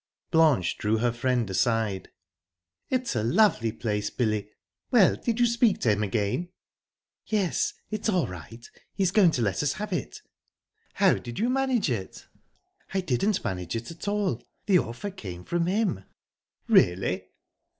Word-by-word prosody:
Blanche 155 - +3
drew 110 +1 +1
her 120 +2 +1
friend 120 -1 0
aside. 105 -1 0 0.8
"It's 255 - -1
a 110 - +1
lovely 120 - +3
place, 105 -2 -2
Billy!...Well, 110 - 0
did 235 -1 -2
you 240 - +5
speak 235 -2 +3
to 115 - +3
him 105 0 0
again?" 105 - -1 0.8
"Yes, 200 -5 0 0.2
it's 215 +1 -1
all 180 -8 +2
right 110 +5 -10 0.3
he's 190 -3 +1
going 195 -3 +6
to 125 -7 0
let 100 -3 0
us 145 -1 +1
have 210 0 -5
it." 175 - -4 0.7
"How - - +5
did 120 - -8
you 235 +4 +1
manage 260 - +1
it?" 95 -6 -5 0.7
"I 190 - +2
didn't 185 - 0
manage 90 -4 -3
it 115 +6 -5
at 165 +4 -9
all; 200 - 0 0.2
the 190 -3 +5
offer 120 - -5
came 90 - -8
from 170 - -1
him." 195 - 0 0.6
"Really?" 90 +1 +3
125 Hz, 150 wpm, -27 LUFS, -, 0.8 s, going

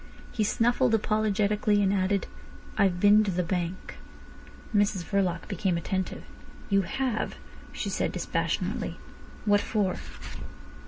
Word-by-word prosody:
He 220 - 0
snuffled 235 +3 +3
apologetically, 210 -1 +2
and 195 0 +3
added: 195 0 +1 0.5
"I've 185 -3 +2
been 205 +2 +6
to 205 - -1
the 180 -1 0
bank." 180 0 -3 0.8
Mrs 205 -3 +2
Verloc 185 -2 0
became 190 -3 0
attentive. 185 +2 -3 0.5
"You 195 0 +5
have!" 220 +5 -2 0.4
she - - -3
said - - 0
dispassionately. - - -2 0.5
"What 205 -1 +4
for?" 205 -4 0
200 Hz, 115 wpm, -28 LUFS, 185-215 Hz, 0.8 s, been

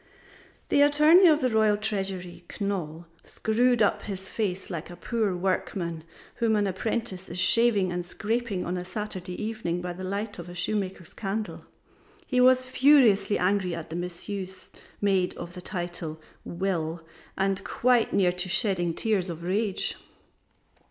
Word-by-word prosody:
The 285 - +4
Attorney 300 +6 +7
of 310 -2 +5
the 255 - +2
Royal 215 -1 +3
Treasury 195 -4 -3
Knol 175 -5 -3 0.2
screwed 240 +1 +2
up 205 - +2
his 190 -2 -5
face 195 -3 -3
like 170 -1 -5
a 175 - -9
poor 215 -2 -1
workman, 175 -2 -2 0.3
whom 225 -2 +2
an 205 -1 +2
apprentice 190 0 -3
is 175 - -6
shaving 200 0 +3
and 175 0 -2
scraping 220 +1 -2
on 180 +1 -2
a 180 - -3
Saturday 185 -1 -5
evening 215 -6 -2
by 180 0 -4
the 185 +2 -8
light 200 +2 -3
of 175 - -8
a 175 - -9
shoemaker's 185 -2 -2
candle; 200 -3 -4 0.6
he 250 -5 +2
was 255 0 +5
furiously 250 -7 +4
angry 185 -1 +1
at 165 -1 -8
the - - -4
misuse 185 +2 -6 0.3
made 195 -3 +2
of 175 0 -7
the 180 - -8
title 175 -4 -5 0.2
"Will" 170 -3 -2 0.3
and 195 0 0
quite 245 -2 +2
near 185 -3 +3
to 180 +1 -4
shedding 175 -3 +1
tears 205 -5 0
of 170 0 -6
rage. 195 +2 -1
195 Hz, 150 wpm, -27 LUFS, 180-220 Hz, 0.6 s, Attorney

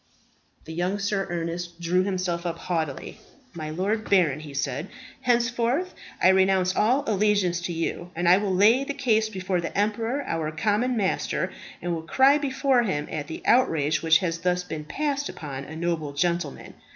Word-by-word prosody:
The 160 - -7
young 180 +4 -1
Sir 200 -1 -1
Ernest 170 0 -4
drew 175 +2 +2
himself 185 -3 -1
up 170 -2 -3
haughtily. 160 -6 -3 0.3
"My 155 -2 -5
lord 200 +7 -2
baron," 170 -8 +3
he 155 -1 -9
said, 140 +4 -2 0.3
"henceforth 245 +6 +1 0.3
I - - +5
renounce 190 -1 +3
all 250 +7 +3
allegiance 200 -5 +1
to 175 - -3
you, 170 +1 -3
and 175 +1 -1
I 180 +2 +7
will 200 -1 -1
lay 215 +8 +5
the 280 0 -4
case 220 -5 +2
before 185 -3 -2
the 170 - -5
emperor, 225 +6 0
our 160 -2 -2
common 215 +9 0
master, 195 -3 -1 0.3
and 175 0 -1
will 165 - -3
cry 265 - +4
before 270 -2 +2
him 170 -10 -2
at 150 -2 -4
the 160 - -7
outrage 155 - +3
which 160 0 +5
has 165 -1 -2
thus 180 +1 0
been 160 -4 -6
passed 285 - -2
upon 140 -3 -7
a 160 - -9
noble 160 -3 -2
gentleman. 170 +4 -2
180 Hz, 175 wpm, -25 LUFS, 165-220 Hz, 0.3 s, I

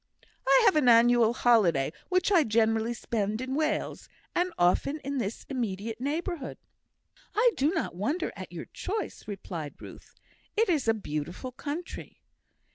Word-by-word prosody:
I 270 0 +6
have - - +5
an 285 -5 +4
annual 235 -1 +6
holiday, 195 - +3 0.2
which 365 +1 +2
I 350 -5 +6
generally 225 0 +1
spend 215 -2 -2
in 260 +1 -3
Wales; 310 +2 -1 0.2
and 360 +1 +1
often 180 - +2
in 275 0 -3
this 210 -1 -4
immediate 225 -3 -3
neighbourhood." 310 +1 -3 0.8
"I 475 +3 +5
do 280 +3 +2
not 330 -1 -2
wonder 280 - -1
at - - -8
your - - -6
choice," 415 - -5
replied 175 -7 -6
Ruth. - - -12 0.4
"It 450 -1 +3
is 300 -9 +1
a 225 - +4
beautiful 170 - -5
country." 300 +7 -6
245 Hz, 145 wpm, -28 LUFS, 215-305 Hz, 0.8 s, I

